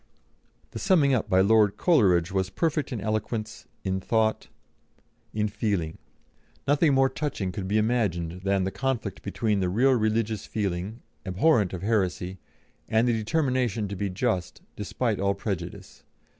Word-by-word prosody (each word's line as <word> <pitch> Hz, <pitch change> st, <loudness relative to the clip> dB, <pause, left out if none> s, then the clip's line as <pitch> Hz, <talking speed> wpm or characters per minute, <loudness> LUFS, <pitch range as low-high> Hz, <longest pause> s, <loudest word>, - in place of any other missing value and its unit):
The -, -, -6 dB
summing 150 Hz, -8 st, +3 dB
up 125 Hz, -, 0 dB
by 95 Hz, 0 st, +5 dB
Lord 105 Hz, 0 st, +4 dB
Coleridge 95 Hz, -, +3 dB
was 95 Hz, -1 st, 0 dB
perfect 155 Hz, -, -1 dB
in 120 Hz, -, -3 dB
eloquence, 110 Hz, +1 st, -3 dB, 0.2 s
in 95 Hz, -1 st, -1 dB
thought, 110 Hz, +2 st, 0 dB, 0.8 s
in 105 Hz, 0 st, 0 dB
feeling. 100 Hz, -7 st, -2 dB, 0.7 s
Nothing 145 Hz, 0 st, +4 dB
more 135 Hz, 0 st, +5 dB
touching 130 Hz, -9 st, -3 dB
could 95 Hz, -1 st, -5 dB
be 105 Hz, +3 st, +1 dB
imagined 95 Hz, -7 st, 0 dB
than 100 Hz, -1 st, +1 dB
the 95 Hz, -, -1 dB
conflict 120 Hz, -7 st, -2 dB
between 105 Hz, +1 st, -1 dB
the 90 Hz, -2 st, 0 dB
real 125 Hz, +9 st, +3 dB
religious 110 Hz, -2 st, 0 dB
feeling, 100 Hz, +2 st, -3 dB, 0.2 s
abhorrent 100 Hz, -, +2 dB
of 95 Hz, -1 st, -6 dB
heresy, 95 Hz, -3 st, -1 dB, 0.5 s
and 110 Hz, +2 st, +3 dB
the 120 Hz, -, +3 dB
determination 120 Hz, -2 st, 0 dB
to 100 Hz, -, -4 dB
be 100 Hz, +1 st, -2 dB
just, 95 Hz, -1 st, -2 dB
despite -, -, -2 dB
all 100 Hz, 0 st, +1 dB
prejudice. 95 Hz, -4 st, -6 dB
105 Hz, 145 wpm, -26 LUFS, 95-120 Hz, 0.8 s, by